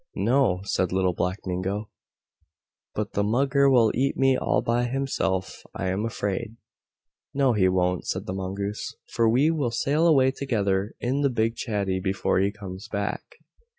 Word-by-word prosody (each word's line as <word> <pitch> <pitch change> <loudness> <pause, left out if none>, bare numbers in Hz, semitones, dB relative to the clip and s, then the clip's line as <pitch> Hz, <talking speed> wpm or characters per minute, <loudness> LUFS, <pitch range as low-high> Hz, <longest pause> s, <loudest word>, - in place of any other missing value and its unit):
"No," 120 -8 +2
said 95 -2 0
Little 95 -1 +1
Black 90 +3 -2
Mingo, 95 +3 -3 1.0
"but 105 0 -3
the 100 - +1
Mugger 135 +5 +3
will 120 -5 +5
eat 135 +3 0
me 135 -1 +4
all - - +1
by 120 +1 +1
himself 120 -8 -2
I 95 - -2
am 95 +4 -1
afraid." 110 +1 -3 0.8
"No 135 -3 +3
he 95 -4 +3
won't," 90 -1 0
said - - -2
the 95 - -4
Mongoose, 100 +2 -4
"for 115 -1 +2
we 135 +8 +3
will 145 -7 0
sail 145 +7 +1
away 135 -5 +5
together 105 -7 -1
in 130 +4 -1
the 140 - +3
big 115 -2 0
chatty 100 -6 -1
before 95 0 0
he 100 +1 +2
comes 95 -2 -9
back." 100 0 -2
105 Hz, 160 wpm, -25 LUFS, 95-130 Hz, 1.0 s, will